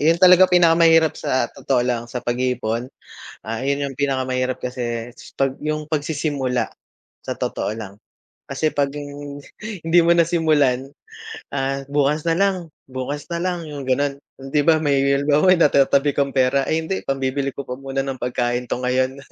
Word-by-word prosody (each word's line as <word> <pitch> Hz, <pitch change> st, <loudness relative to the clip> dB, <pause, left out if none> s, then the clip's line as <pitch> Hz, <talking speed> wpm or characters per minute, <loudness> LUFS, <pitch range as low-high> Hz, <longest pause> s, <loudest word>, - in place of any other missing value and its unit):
yun 160 Hz, +3 st, +4 dB
talaga 185 Hz, +1 st, +7 dB
pinakamahirap 165 Hz, -2 st, +5 dB
sa 130 Hz, -, 0 dB
totoo 125 Hz, -2 st, 0 dB
lang, 120 Hz, -2 st, -1 dB
sa 125 Hz, 0 st, -6 dB
pag-iipon. 120 Hz, -1 st, -1 dB, 0.5 s
Ah, 115 Hz, +6 st, -4 dB
yun 140 Hz, +1 st, 0 dB
yung 135 Hz, -, -11 dB
pinakamahirap 130 Hz, -2 st, -1 dB
kasi 120 Hz, -2 st, -4 dB, 0.3 s
'pag 135 Hz, 0 st, 0 dB
yung 155 Hz, 0 st, -3 dB
pagsisimula 145 Hz, -5 st, -1 dB, 0.5 s
sa -, -, -4 dB
totoo -, -, -2 dB
lang. 100 Hz, -3 st, -8 dB, 0.5 s
Kasi 155 Hz, -1 st, -1 dB
'pag 140 Hz, -1 st, +1 dB
yung 145 Hz, 0 st, -7 dB, 0.5 s
hindi 170 Hz, +2 st, +4 dB
mo 170 Hz, +1 st, +4 dB
nasimulan 155 Hz, -6 st, +2 dB, 0.7 s
ah, 135 Hz, 0 st, -1 dB
"Bukas 145 Hz, +1 st, +1 dB
na 165 Hz, -, +2 dB
lang, 195 Hz, -1 st, +3 dB, 0.3 s
bukas 130 Hz, +3 st, -5 dB
na 170 Hz, -, -1 dB
lang", 175 Hz, -3 st, -2 dB
yung 140 Hz, -3 st, -7 dB
ganon. 140 Hz, +1 st, 0 dB, 0.2 s
Hindi 135 Hz, +2 st, -1 dB
ba 160 Hz, -1 st, +5 dB
may 140 Hz, -2 st, +2 dB, 0.2 s
halimbawa, 150 Hz, +6 st, +4 dB
may -, -, +2 dB
natatabi 140 Hz, -1 st, +3 dB
kang 140 Hz, -1 st, +2 dB
pera, 130 Hz, +1 st, +3 dB
"Ay 160 Hz, +1 st, +1 dB
hindi 190 Hz, +3 st, -2 dB
pambibili 135 Hz, 0 st, -1 dB
ko 140 Hz, -, -5 dB
pa 125 Hz, -, -4 dB
muna 135 Hz, 0 st, -3 dB
ng 135 Hz, -1 st, -5 dB
pagkain 120 Hz, 0 st, -1 dB
'to 125 Hz, -, -2 dB
ngayon". 130 Hz, +1 st, 0 dB
140 Hz, 160 wpm, -21 LUFS, 130-155 Hz, 0.7 s, talaga